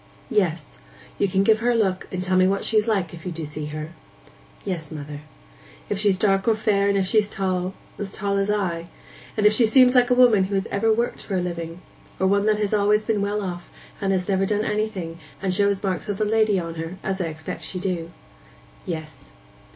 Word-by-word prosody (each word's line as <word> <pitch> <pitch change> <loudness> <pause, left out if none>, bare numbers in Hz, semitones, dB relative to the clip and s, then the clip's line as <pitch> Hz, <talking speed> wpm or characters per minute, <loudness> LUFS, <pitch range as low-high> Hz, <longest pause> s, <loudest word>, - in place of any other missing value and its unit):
'Yes... 170 -7 0 0.4
You 200 - +3
can 190 +1 +2
give 215 +1 +4
her 240 +2 +1
a 240 - +3
look, 190 -5 0
and 185 -1 -3
tell 185 0 0
me 185 0 +5
what's 195 +1 0
she's 215 -1 +2
like, 195 -7 0
if 165 -1 -10
you 180 - -4
do 165 -1 -5
see 150 0 -6
her.' 155 +1 -6 0.7
'Yes, 170 -6 -3
mother.' 145 -1 -7 0.7
'If 200 - -1
she's 200 -2 +3
dark 195 0 +2
or 225 - +4
fair, 205 -2 +2
and 200 - +2
if 195 - +1
she's 210 +2 +3
tall—as 190 +1 -3
tall 200 0 -2
as 200 +1 0
I. 175 -5 -1 0.5
And 210 - +2
if 210 - +7
she 230 - +3
seems 250 +3 +6
like 250 -1 +4
a 250 - +4
woman 235 -6 +5
who 200 +1 -3
has 195 - 0
ever 220 +3 +2
worked 235 +2 0
for 195 - -4
a - - +2
living, 170 -1 -5 0.4
or 190 - +2
one 200 +2 +2
that 215 -1 +3
has 210 -1 -1
been 210 - +2
always 210 +1 +2
well 205 -1 0
off, 175 -2 -6 0.3
and 195 -1 +1
has 185 -1 0
never 195 -1 +1
done 210 +1 0
anything, 200 -6 -2 0.2
and 190 -1 -1
shows 200 0 +2
marks 190 +1 -2
of 205 - -1
the 215 - +1
lady 215 -1 +3
on 165 -2 -3
her, 165 +3 -6
as 190 0 -2
I - - 0
expect 160 -1 -6
she 185 - -4
do.' 175 -3 -2 0.8
'Yes. 155 - -6
195 Hz, 220 wpm, -23 LUFS, 180-210 Hz, 0.8 s, if